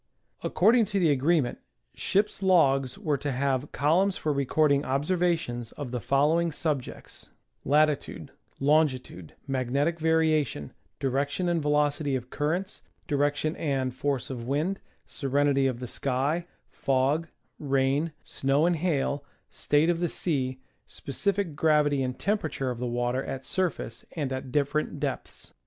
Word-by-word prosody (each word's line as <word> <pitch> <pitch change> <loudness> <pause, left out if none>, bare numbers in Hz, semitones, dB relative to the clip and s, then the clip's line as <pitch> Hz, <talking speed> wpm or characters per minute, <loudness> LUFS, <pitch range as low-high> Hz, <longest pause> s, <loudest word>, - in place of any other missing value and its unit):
According 225 +4 +4
to 200 0 -1
the 165 -4 +4
agreement, 140 -1 +1 0.3
ships' 205 +1 0
logs 135 -9 +3
were 155 -9 -1
to 145 +1 -2
have 135 +1 -1
columns 180 +8 +2
for 150 - -1
recording 140 +1 +2
observations 145 -5 -1
of 140 -5 -6
the 125 - -2
following 150 - +2
subjects: 145 -4 -4 0.3
latitude, 150 +1 +1 0.3
longitude, 135 - +1
mag 130 -3 -2
netic 150 +5 +1
variation, 155 - +1 0.3
direction 140 +6 -1
and 170 -2 +1
velocity 145 -1 +1
of 125 0 -5
currents, 175 +7 -2 0.3
direction 145 +1 0
and 135 -4 -1
force 135 0 -2
of 120 -2 -6
wind, 155 +9 0 0.3
serenity 140 0 +1
of 125 -2 -2
the 125 - -5
sky, 140 +8 -1 0.2
fog, 140 +4 +1 0.3
rain, 140 +3 +1
snow 135 +3 +1
and 175 -1 +2
hail, 145 -4 0 0.3
state 150 +4 +2
of 170 - -2
the 175 -1 0
sea, 130 -7 -1 0.3
specific 190 +3 -2
gravity 150 -2 +3
and 130 -1 -2
temperature 160 -10 -1
of 120 - -6
the 125 - -2
water 120 +2 -1
at 130 - -5
the - - -14
surface 185 -2 -2
and 140 -5 -2
at 130 -1 -5
different 145 +1 0
depths. 140 -3 -5
145 Hz, 140 wpm, -27 LUFS, 135-160 Hz, 0.3 s, According